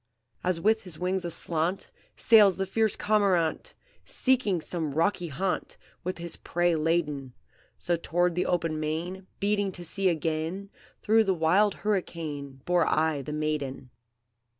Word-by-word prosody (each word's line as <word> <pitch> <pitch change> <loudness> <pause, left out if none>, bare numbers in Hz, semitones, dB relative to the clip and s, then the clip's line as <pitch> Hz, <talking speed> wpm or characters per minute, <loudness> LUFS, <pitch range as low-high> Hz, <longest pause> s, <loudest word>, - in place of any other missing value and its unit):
"As 180 -2 +1
with 220 +4 +2
his 180 -5 -8
wings 185 +1 -1
aslant, 170 +2 -1 0.2
Sails 210 -5 +6
the 195 - -1
fierce 220 +3 +1
cormorant, 200 - +1 0.3
Seeking 250 -9 +1
some 155 -3 -4
rocky 175 +2 +1
haunt, 180 +6 -3 0.3
With 185 - -3
his 170 0 -4
prey 175 0 0
laden, 155 -5 -1 0.4
So 175 - 0
toward 175 +1 0
the 180 - -1
open 165 -3 0
main, 170 +5 -4
Beating 205 -1 +1
to 175 - -7
sea 190 +3 +1
again, 165 +4 -2 0.3
Through 220 +1 +4
the 190 -1 +1
wild 185 +5 +3
hurricane, 150 -9 -3
Bore 175 -2 +2
I 155 -2 +1
the 145 - -6
maiden. 150 -4 -3
175 Hz, 140 wpm, -28 LUFS, 160-195 Hz, 0.4 s, Sails